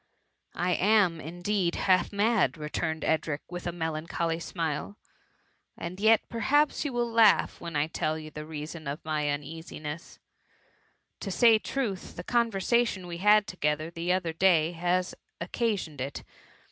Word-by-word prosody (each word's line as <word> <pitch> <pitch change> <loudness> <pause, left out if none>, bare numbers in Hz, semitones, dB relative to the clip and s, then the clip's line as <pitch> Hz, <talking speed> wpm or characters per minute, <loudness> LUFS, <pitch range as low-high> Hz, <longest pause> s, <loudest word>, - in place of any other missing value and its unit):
^ - - -44 0.2
" - - -38
I - - +2
am, 185 -3 +3
indeed, 175 +2 -1
half 185 -2 +2
mad,'' 205 - +2
returned 160 +1 -3
Edric, 155 -2 0
with 175 0 -5
a - - -1
melancholy 165 0 -2
smile; 165 +3 -3 0.4
" - - -43
and 185 +2 -6
yet, 220 +1 +4
perhaps, 285 +8 +2
you 290 - -2
will 240 -1 0
laugh 225 -2 +4
when 170 -2 -6
I 145 0 +2
tell 155 0 -2
you 155 -1 -9
the 150 - -7
reason 155 0 -7
of 145 +4 -5
my 150 -2 0
uneasiness: 150 +1 -6 1.0
to 200 - -5
say 225 +3 +5
truth, 215 -7 -3
the 175 - -6
conversatioQ 230 -2 +1
.we 170 -1 -5
had 210 +2 +5
together 155 -3 -2
the 170 +1 -2
other 180 -3 0
day 170 -1 +3
ha9 180 +2 0 0.3
occa* 225 +6 0
siqned 160 -8 -6
it. 135 +2 -5
175 Hz, 160 wpm, -28 LUFS, 155-205 Hz, 1.0 s, say